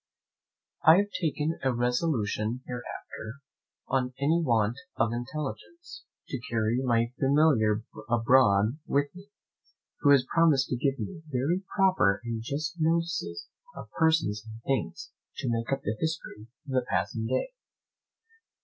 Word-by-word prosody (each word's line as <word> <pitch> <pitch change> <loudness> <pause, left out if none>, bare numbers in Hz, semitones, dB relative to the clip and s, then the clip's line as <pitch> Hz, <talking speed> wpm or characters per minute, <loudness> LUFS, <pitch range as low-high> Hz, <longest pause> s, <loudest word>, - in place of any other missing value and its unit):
I 160 +2 +8
have 205 +1 +1
taken 160 0 -1
a 130 - +2
resolution 120 -2 0
hereafter, 120 -2 -7 0.5
on 130 -1 0
any 160 +5 +2
want 115 -4 +2 0.2
of 115 0 +1
intelligence, 150 - -6 0.2
to 135 - -5
carry 115 +1 +1
my 115 -1 +1
Familiar 135 -7 +3 0.3
abroad 115 0 +4
with 145 +1 +1
me, 190 +3 -13 0.7
who 145 - +3
has 140 -3 +6
promised 155 -6 +4
to - - 0
give 135 +2 0
me 180 +1 -6
very 145 +7 0
proper 185 - +3
and 115 -1 -3
just 150 +7 -3
notices 165 - 0 0.3
of - - -9
persons 160 -11 +2
and 110 0 -11
things, 135 -1 -2 0.3
to - - -3
make 115 +1 -2
up 135 0 -1
the 105 - -1
history 160 -9 -4 0.2
of 140 - -8
the 130 -1 +1
passing 95 +5 -1
day. - - -1
130 Hz, 135 wpm, -28 LUFS, 115-160 Hz, 0.7 s, I